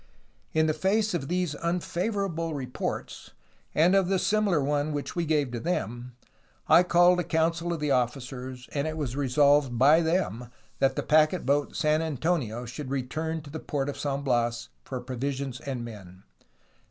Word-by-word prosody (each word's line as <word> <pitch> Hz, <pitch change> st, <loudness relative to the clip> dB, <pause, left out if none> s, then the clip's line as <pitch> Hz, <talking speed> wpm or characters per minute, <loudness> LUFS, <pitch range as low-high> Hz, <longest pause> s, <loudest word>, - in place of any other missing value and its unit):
"In 155 Hz, 0 st, +2 dB
the 155 Hz, -, +2 dB
face 200 Hz, +6 st, +1 dB
of 155 Hz, -6 st, -2 dB
these 180 Hz, -2 st, -1 dB
unfavorable 170 Hz, 0 st, -2 dB
reports, 130 Hz, -3 st, -5 dB, 0.4 s
and 170 Hz, +4 st, +4 dB
of 195 Hz, -2 st, +3 dB
the 195 Hz, 0 st, +2 dB
similar 200 Hz, -3 st, +2 dB
one 145 Hz, +2 st, 0 dB
which 145 Hz, -1 st, -4 dB
we 170 Hz, -1 st, 0 dB
gave 145 Hz, -5 st, +1 dB
to 120 Hz, -, -3 dB
them, 120 Hz, -6 st, -3 dB, 0.5 s
I -, -, +7 dB
called 180 Hz, 0 st, +4 dB
a -, -, +1 dB
council 165 Hz, +1 st, 0 dB
of 170 Hz, -, -2 dB
the 150 Hz, -1 st, -1 dB
officers, 125 Hz, 0 st, -2 dB
and 145 Hz, +1 st, -1 dB
it 155 Hz, 0 st, -4 dB
was 135 Hz, -5 st, -3 dB
resolved 140 Hz, -1 st, +3 dB
by 145 Hz, +7 st, +6 dB
them 160 Hz, -, -1 dB, 0.3 s
that 135 Hz, 0 st, +2 dB
the -, -, -2 dB
packet 155 Hz, +3 st, +3 dB
boat 145 Hz, +2 st, +1 dB
San 155 Hz, 0 st, +2 dB
Antonio 145 Hz, -6 st, -1 dB
should 130 Hz, +3 st, -7 dB
return 155 Hz, +5 st, -3 dB
to 145 Hz, -1 st, -12 dB
the 160 Hz, -, -5 dB
port 145 Hz, -2 st, -2 dB
of 145 Hz, -, -6 dB
San 140 Hz, -1 st, -2 dB
Bias 120 Hz, -3 st, 0 dB
for 130 Hz, -, -5 dB
provisions 130 Hz, +1 st, -4 dB
and 130 Hz, -4 st, -5 dB
men. 95 Hz, -5 st, -11 dB
145 Hz, 170 wpm, -27 LUFS, 130-165 Hz, 0.5 s, I